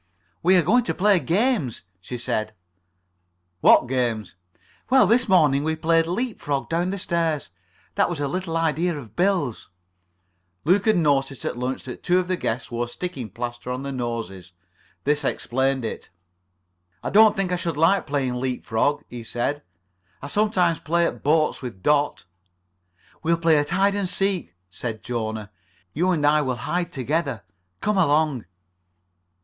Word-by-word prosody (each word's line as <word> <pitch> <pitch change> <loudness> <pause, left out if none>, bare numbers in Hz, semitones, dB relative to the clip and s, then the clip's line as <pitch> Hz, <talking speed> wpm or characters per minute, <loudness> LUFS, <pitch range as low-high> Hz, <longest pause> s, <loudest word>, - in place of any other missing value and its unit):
"We 185 +2 +5
are 175 - +4
going 240 +10 +3
to - - -2
play 200 -1 +4
games," 175 - 0 0.2
she 120 +7 -7
said. 110 -2 -3 1.0
"What - - +7
games?" 120 -5 -1 0.6
"Well, 260 -3 +6
this 235 +4 +2
morning 145 -7 +4
we 160 +1 0
played 165 +1 +2
leap 225 +7 -2
frog 140 -2 -2
down 170 +2 0
the 200 - -3
stairs. 165 -5 -1 0.4
That - - +2
was 175 -4 -4
a 145 - 0
little 165 +2 -2
idea 165 +1 0
of 115 -7 -11
Bill's." 175 - 0 1.0
Luke 190 +6 +3
had 215 -3 +4
noticed 140 -4 +1
at - - -2
lunch 125 +2 -3
that 125 - -8
two 180 0 +2
of 185 -1 0
the 185 - 0
guests 120 -7 -3
wore 120 0 -2
sticking 135 -3 -5
plaster 120 0 -6
on 130 +2 -4
their 140 - -4
noses. 115 -8 -5 0.5
This 150 +1 +1
explained 130 0 0
it. 110 - -6 0.9
"I - - -3
don't 215 +1 +6
think 190 -2 -1
I - - +2
should 170 -4 -3
like 165 +4 +3
playing 130 -4 -1
leap 130 -1 -3
frog," 115 +6 0
he 120 -1 -8
said. 120 +6 -2 0.6
"I - - -9
sometimes 185 -4 +2
play 170 +3 +1
at - - -3
boats 155 +1 +2
with 115 -8 -8
Dot." 145 -9 +1 1.0
"We'll 165 +1 +2
play 165 -2 +4
at 145 - -2
hide 195 +3 +2
and 200 -2 0
seek," 190 - 0 0.2
said 110 +2 -5
Jona. 110 -3 -4 0.4
"You 175 +5 +1
and 160 -5 +1
I 150 +1 +4
will 130 -3 -1
hide 175 +8 -2
together. 140 - -2 0.4
Come 210 -1 +1
along." 150 - +2
150 Hz, 165 wpm, -23 LUFS, 125-180 Hz, 1.0 s, What